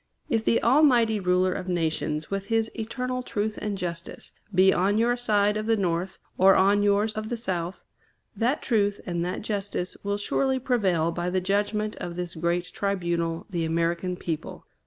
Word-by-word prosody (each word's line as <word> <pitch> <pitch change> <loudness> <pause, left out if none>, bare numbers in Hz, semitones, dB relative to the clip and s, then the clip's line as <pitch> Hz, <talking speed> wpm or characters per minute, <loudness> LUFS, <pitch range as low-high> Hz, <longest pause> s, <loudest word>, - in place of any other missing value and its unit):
If 225 -5 +1
the 230 - +2
Almighty 240 -5 +4
Ruler 180 0 +2
of 185 - -5
nations, 160 -2 -1
with 195 0 -3
his 225 0 +1
eternal 250 +3 -3
truth 215 -3 -3
and 210 -2 -2
justice, 170 -2 -6 0.2
be 190 0 +5
on 195 +4 +2
your 235 +2 +3
side 210 -3 +2
of 215 +1 -3
the 225 -1 +3
North, 180 -1 -1 0.2
or 190 +1 +7
on 200 +2 +4
yours 205 +1 +2
of 215 0 -4
the 240 - -2
South, 180 -5 -3 0.5
that 250 +6 0
truth 205 -4 +1
and 175 -2 -2
that 180 +3 -3
justice 200 -4 -3
will 200 0 -1
surely 265 +6 0
prevail 190 -11 +1
by 175 +1 -2
the 185 +1 +1
judgment 205 +3 -1
of 175 -1 -5
this 180 -1 -4
great 170 +2 -1
tribunal, 170 -4 -1
the 170 -3 -1
American 170 +2 0
people. 165 -4 -5
200 Hz, 175 wpm, -26 LUFS, 175-220 Hz, 0.5 s, or